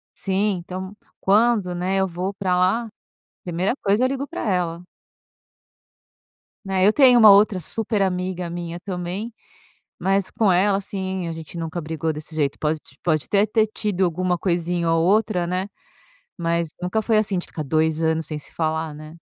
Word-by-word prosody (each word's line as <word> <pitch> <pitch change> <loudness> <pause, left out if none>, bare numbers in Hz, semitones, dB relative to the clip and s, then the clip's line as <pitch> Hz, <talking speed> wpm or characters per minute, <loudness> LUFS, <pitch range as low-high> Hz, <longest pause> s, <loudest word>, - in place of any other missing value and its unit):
Sim, 195 0 0
então, 185 +3 -7 0.2
quando, 205 -2 +3
né, 185 +2 -1
eu 190 0 +2
vou 180 +2 -3
pra 185 -2 0
lá, 190 +6 +2 0.6
primeira 180 +6 -1
coisa, 205 +5 +2
eu - - +3
ligo 275 +1 -3
pra - - -5
ela. 180 -3 -1 1.8
Né, 190 0 +2
eu 215 - +5
tenho 255 -4 +6
uma 220 -2 +9
outra 200 -1 +6
super 215 +4 -2
amiga 180 -2 -1
minha 170 0 -5
também, 185 +4 -5 0.6
mas 195 0 +1
com 215 -4 +2
ela, 195 +2 +3
assim, 190 -2 -4
a - - -3
gente 160 +1 -8
nunca 165 +1 -4
brigou 160 0 -2
desse 155 +1 -8
jeito, 145 -3 -1
pode 155 0 0 0.2
pode 155 -4 +1
até 205 0 +3
ter 215 +1 +2
tido 210 -3 -2
alguma 180 0 0
coisinha 170 -1 0
ou 165 0 +3
outra, 200 -3 +2
né, 185 +3 -2 0.7
mas 170 -2 -1
nunca 180 +5 0
foi 220 -1 +3
assim, 200 -3 -1
de 175 - -3
ficar 155 - -7
2 155 +2 +1
anos 160 0 +1
sem 155 0 -5
se - - -14
falar, 160 -1 -2
né. 155 +2 -11
180 Hz, 170 wpm, -22 LUFS, 165-200 Hz, 1.8 s, uma